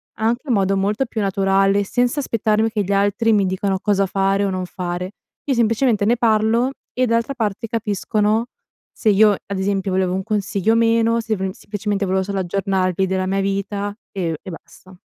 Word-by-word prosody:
anche 230 +3 0
in 250 - +2
modo 195 -2 +2
molto 205 +6 0
più 225 -2 -3
naturale 195 0 +2
senza 245 +7 0
aspettarmi 220 -4 +1
che 215 -2 -1
gli 195 - -4
altri 205 +3 +2
mi 200 -2 +3
dicano 190 +1 -1
cosa 200 -1 +1
fare 195 +1 +1
o 195 - -1
non 185 -1 -3
fare. 180 +1 -5 0.3
Io 275 - +1
semplicemente 230 -1 +2
ne 235 +3 +3
parlo, 225 +2 +2 0.2
e 255 0 +1
d'altra 230 +3 0
parte 225 -3 -2
capiscono 215 0 0 0.5
se 220 - 0
io, 210 +1 +6
ad 200 0 -4
esempio, 195 0 -1
volevo 185 -1 +1
un 190 - -1
consiglio 205 0 0
o - - +3
meno, 230 0 +3
sev 215 -4 -2
semplicemente 205 0 -3
volevo 190 0 0
solo 195 0 -3
aggiornarvi 190 0 0
della 190 0 -1
mia 195 +1 0
vita 200 +1 -2 0.2
e 170 -5 -2
e - - -10
basta. 185 +2 -13
200 Hz, 185 wpm, -20 LUFS, 195-225 Hz, 0.5 s, io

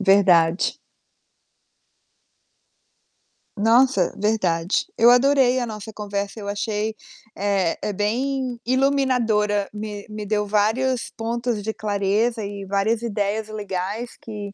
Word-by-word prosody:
Verdade. 185 -4 +4 2.8
Nossa, 225 -2 +3
verdade. 190 -5 0
Eu 235 +2 +7
adorei 260 0 +4
a 245 - -1
nossa 220 -1 -7
conversa, 205 0 -4
eu 200 - -7
achei 210 +1 -2 0.4
eh, 195 -4 0
é 210 - -2
bem 245 +4 -1
iluminadora, 245 -6 +1
me 210 -1 -6
me 210 0 -6
deu 210 0 0
vários 225 +5 +1
pontos 235 0 -2
de 220 +2 -3
clareza 210 +3 0
e 200 -1 -6
várias 200 +4 0
ideias 215 -1 -2
legais 205 +2 -4
que 205 -3 -7
210 Hz, 105 wpm, -22 LUFS, 200-235 Hz, 2.8 s, Eu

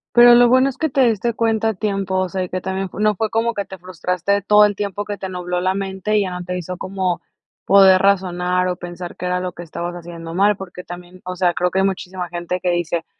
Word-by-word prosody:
Pero 240 0 +9
lo 240 0 +6
bueno 260 +2 +4
es 260 - -13
que 315 - 0
te 270 -1 +2
diste 230 +1 -1
cuenta 225 -1 +1
a - - -4
tiempo, 195 -1 -2
o 185 0 +1
sea, 185 +1 -3
y 180 - -4
que 185 - -3
también 190 +1 -3
no 210 0 +2
fue 220 +3 -1
como 230 +1 +1
que 200 - -2
te 190 - -10
frustraste 180 +2 -1
todo 210 +2 +6
el 205 0 +2
tiempo, 205 0 -3
que 205 -1 -5
te 190 - -5
nubló 180 -1 -3
la 185 +1 +1
mente 195 +2 -2
y 210 - +3
ya 190 - -3
no 180 0 -5
te 180 +1 -4
hizo 180 +1 -5
como 185 -2 -2 0.5
poder 190 -1 +7
razonar 180 -2 +1
o 180 - -2
pensar 175 0 -8
qué 180 - -5
era 180 0 0
lo 180 0 -4
que 175 - -9
estabas 175 +1 -5
haciendo 170 -1 -8
mal. 200 +3 +3
Porque 185 -2 -9
también, 175 +1 -11
o 185 0 -5
sea, 180 -1 +2
creo 180 +1 0
que 190 - 0
hay - - +2
muchísima 185 -2 -3
gente 175 +1 -3
que 180 - 0
dice: 170 -1 -1
185 Hz, 260 wpm, -20 LUFS, 180-205 Hz, 0.5 s, Pero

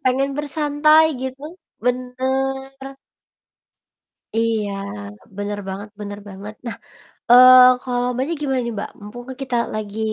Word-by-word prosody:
pengen 270 +2 +1
bersantai 295 +1 +3 0.2
gitu, 260 +1 -6 0.4
benar. 265 +2 -2 1.5
Iya, 225 -3 0 0.7
benar 205 0 -4
banget 200 +2 -6
benar 205 0 -6
banget. 200 +2 -9
Nah, 235 - -4 0.5
eee, 255 0 +9
kalau 245 -1 -1
Mbaknya 265 +7 -2
gimana 265 -3 0
nih 235 - -4
Mbak? 200 - -4
Mumpung 220 +4 -9
kan 260 - -7
kita 255 -2 -2 0.2
lagi 215 0 -5
255 Hz, 120 wpm, -21 LUFS, 220-270 Hz, 1.5 s, eee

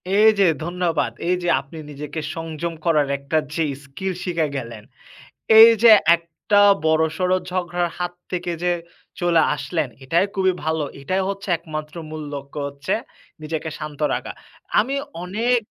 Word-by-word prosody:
এই 215 +2 +7
যে 195 - +6 0.2
ধন্যবাদ। 175 -1 -1 0.2
এই 180 - +3
যে - - -1
আপনি 140 +4 -11
নিজেকে 150 +2 -6 0.2
সংযম 165 0 -4
করার 155 -4 +3
একটা 140 +3 -2 0.2
যে 165 - +1 0.2
স্কিল 185 +8 -4
শিখে 170 -4 0
গেলেন, 115 -4 -7 0.8
এই 225 +1 +11
যে 230 - +9 0.2
একটা 170 +5 -1 0.3
বড়সড় 160 +3 +2 0.2
ঝগড়ার 175 -1 -1
হাত 175 0 -3 0.2
থেকে 180 -1 -2
যে 180 - +2 0.5
চলে 170 -2 +4
আসলেন, 160 -1 -2 0.2
এটাই 170 +8 +2
খুবই 190 -1 +2
ভালো। 160 0 0 0.2
এটাই 185 +7 0
হচ্ছে 195 0 -5
একমাত্র 155 -1 -7
মূল 155 -1 -6
লক্ষ্য 140 +1 -7
হচ্ছে 140 -1 -3 0.5
নিজেকে 155 +1 -4
শান্ত 150 -2 -7
রাখা। - - -3 0.5
আমি 260 +6 0 0.3
অনেক 225 +7 +1
170 Hz, 145 wpm, -22 LUFS, 155-180 Hz, 0.8 s, এই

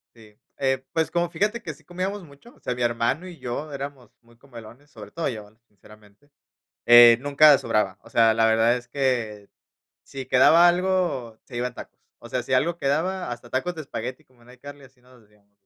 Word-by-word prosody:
Sí. 110 -2 -19 0.2
Eh, 135 -1 -1
pues, 160 -1 -1
como, 175 0 -1
fíjate 210 +6 -2
que 165 - -7
sí 155 +3 -22
comíamos 185 +4 -5
mucho, 150 - -18
o - - -25
sea, 125 - -3
mi 125 - -7
hermano 120 +8 -1
y 175 -2 -11
yo 140 +3 -6
éramos 140 -4 -8
muy 115 0 -24
comelones, 120 +2 -14
sobre 105 -7 -13
todo 165 -1 -3
yo, 105 -3 -7 0.2
sinceramente. 105 +6 -21 0.6
Eh, 120 -1 +8
nunca 145 +1 +5
sobraba, 100 -3 -1
o - - -17
sea, 115 -1 +3
la 115 0 +2
verdad 115 +2 +3
es 120 -1 -16
que 120 -6 -2 0.5
si 135 -1 -8
quedaba 160 +7 +5
algo, 175 -10 -1
se 125 - -10
iban 125 +1 -3
tacos. - - -12 0.2
O 120 - -12
sea, 125 0 -3
si 130 - -6
algo 160 +7 +1
quedaba, 160 +2 -2
hasta 120 0 -10
tacos 155 +8 -2
de 160 - -8
espagueti, 125 -2 -7
como 125 -2 -28
en 120 - -18
iCarly, 140 +3 -13
así 130 -1 -21
nos 125 0 -21
decíamos, 100 -1 -30
130 Hz, 200 wpm, -24 LUFS, 115-150 Hz, 0.6 s, Eh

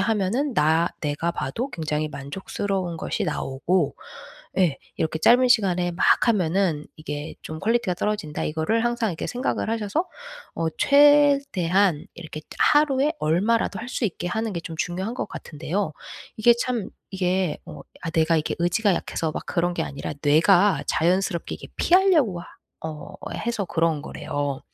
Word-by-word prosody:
하면은 225 +6 0
나 160 +1 +3
내가 150 +3 -1
봐도 225 - -3
굉장히 155 - -2
만족스러운 175 +5 -4
것이 - - -2
나오고 150 +8 -1 0.6
예 170 -7 +2 0.2
이렇게 160 0 -1
짧은 250 +8 +5
시간에 185 -7 +3
막 175 - 0 0.2
하면은 180 -6 +1
이게 150 -1 -6
좀 155 - -6
퀄리티가 230 -4 +1
떨어진다.' 205 -5 -2
이거를 160 +10 0
항상 240 -2 0
이렇게 165 - -4
생각을 245 -2 -2
하셔서 225 - -1 0.5
어 165 - -1
최대한 280 - +4
이렇게 155 -2 -8 0.2
하루에 295 0 +4
얼마라도 195 +9 +1
할 240 - -7
수 250 - -2
있게 175 -3 -2
하는 220 +4 -2
게 170 - -3
좀 165 -1 -7
중요한 185 +6 -2
것 - - -3
같은데요. 160 +2 -4 0.4
이게 235 +2 +5
참 240 -4 -2 0.2
이게 185 -3 0
어 - - -9 0.2
아 165 - -3
내가 165 0 +2
이게 155 - -1
의지가 180 +4 +2
약해서 160 -2 -2
막 - - -5
그런 175 0 0
게 165 - -1
아니라 140 -2 -5
뇌가 175 +7 +4
자연스럽게 175 +1 0
이렇게 - - -11
피하려고 335 - +3
하 - - -13 0.4
어 160 +4 -7 0.2
해서 230 -3 -2
그런 165 -3 0
거래요 145 -2 -3
180 Hz, 330 characters per minute, -24 LUFS, 160-225 Hz, 0.6 s, 짧은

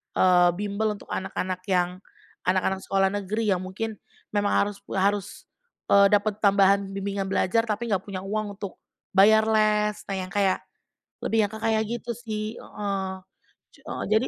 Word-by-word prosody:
eee, 180 -1 +5
bimbel 210 +1 -1
untuk - - -15
anak-anak 185 -1 -3
yang 180 0 +1 0.5
anak-anak 185 +1 +1
sekolah 195 0 +2
negeri 205 +2 -1
yang 180 - -1
mungkin 210 +3 -4 0.4
memang 205 0 +1
harus 205 -1 -5 0.2
harus, 200 +1 +1 0.6
eee, 200 0 +7
dapat 205 0 +2
tambahan 200 0 +4
bimbingan 195 0 -2
belajar 225 +4 +2
tapi 220 +2 -2
nggak 190 -1 +1
punya 185 -2 -5
uang 210 0 -3
untuk 200 -2 -7 0.4
bayar 220 +2 +7
les, 210 -1 +2
nah - - -1
yang 185 0 -4
kayak, 195 -2 +2 0.6
lebih 220 -1 +2
yang 205 - -6
ke 220 - -7
kayak 220 -1 +2
gitu 240 0 -4
sih, 220 -1 -4
heeh. 195 -2 -4 0.6
Cu - - -21
heeh, - - -4
jadi 235 +4 +2
200 Hz, 160 wpm, -26 LUFS, 190-215 Hz, 0.6 s, eee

